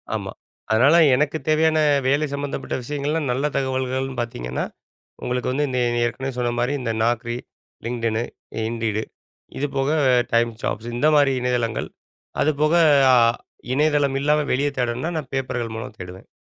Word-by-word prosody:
ஆமா. -, -, -4 dB, 0.4 s
அதனால 130 Hz, +9 st, +5 dB, 0.2 s
எனக்கு 150 Hz, +3 st, 0 dB
தேவையான 155 Hz, 0 st, +3 dB, 0.3 s
வேலை 145 Hz, +3 st, +2 dB
சம்மந்தப்பட்ட 140 Hz, 0 st, -3 dB
விஷயங்கள்லாம் 145 Hz, +2 st, -2 dB
நல்ல 135 Hz, +4 st, -1 dB
தகவல்கள்ன்னு 130 Hz, -1 st, -1 dB
பாத்தீங்கன்னா, 65 Hz, -, -4 dB, 0.6 s
உங்களுக்கு 125 Hz, 0 st, -1 dB
வந்து 145 Hz, +2 st, 0 dB
இந்த 125 Hz, -1 st, -1 dB, 0.3 s
ஏற்கனவே 135 Hz, +3 st, -3 dB
சொன்ன 120 Hz, -1 st, 0 dB
மாரி 125 Hz, +4 st, 0 dB
இந்த 115 Hz, -, -1 dB
Naukri, 120 Hz, +1 st, 0 dB, 0.5 s
LinkedInனு, 115 Hz, -1 st, -1 dB, 0.4 s
Indeed, 115 Hz, -2 st, -2 dB, 0.6 s
இது 145 Hz, +2 st, -1 dB
போக 135 Hz, +2 st, +1 dB, 0.4 s
TimesJobs 115 Hz, -1 st, 0 dB
இந்த 150 Hz, +5 st, +2 dB
மாரி 140 Hz, -2 st, +4 dB
இணையதளங்கள். 120 Hz, -3 st, -1 dB, 0.5 s
அது 155 Hz, -, +3 dB
போக 155 Hz, +2 st, +3 dB, 0.4 s
அ -, -, +7 dB, 0.6 s
இணையதளம் 145 Hz, -1 st, +2 dB
இல்லாம 150 Hz, +1 st, +3 dB
வெளிய 140 Hz, +3 st, +1 dB
தேடணும்ன்னா 125 Hz, +7 st, -1 dB
நான் 140 Hz, -4 st, -6 dB
பேப்பர்கள் 125 Hz, -4 st, -2 dB
மூலம் 110 Hz, -1 st, -7 dB
தேடுவேன். 90 Hz, +1 st, -9 dB
130 Hz, 135 wpm, -22 LUFS, 120-145 Hz, 0.6 s, அ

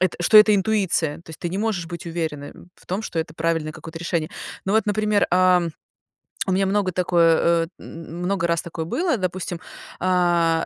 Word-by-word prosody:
это, 185 Hz, -1 st, +1 dB
что 215 Hz, -, +5 dB
это 210 Hz, 0 st, +8 dB
интуиция. 190 Hz, -7 st, +1 dB
То 165 Hz, -, -14 dB
есть, 160 Hz, -, -10 dB
ты 175 Hz, -, -2 dB
не 185 Hz, -, -3 dB
можешь 205 Hz, -6 st, -1 dB
быть 170 Hz, 0 st, -8 dB
уверенным 160 Hz, -2 st, -5 dB
в -, -, -22 dB
том, 190 Hz, +4 st, -2 dB
что 175 Hz, -, -4 dB
это 160 Hz, -1 st, -3 dB
правильное 160 Hz, -1 st, -1 dB
какое-то 160 Hz, +2 st, -9 dB
решение. 170 Hz, -2 st, -2 dB, 0.3 s
Ну 195 Hz, -, -1 dB
вот, 220 Hz, +1 st, +2 dB
например, 210 Hz, 0 st, +2 dB
а, 180 Hz, 0 st, +4 dB, 0.9 s
у 190 Hz, -, +1 dB
меня 195 Hz, +1 st, +2 dB
много 195 Hz, -1 st, +1 dB
такое, 170 Hz, -1 st, +3 dB
э, -, -, -14 dB
м 165 Hz, +1 st, -9 dB
много 190 Hz, -1 st, 0 dB
раз 170 Hz, -1 st, +1 dB
такое 165 Hz, -1 st, -5 dB
было, 325 Hz, -, 0 dB
допустим, 185 Hz, -2 st, -3 dB, 0.4 s
а, 175 Hz, -2 st, +2 dB
175 Hz, 190 wpm, -23 LUFS, 165-190 Hz, 0.9 s, это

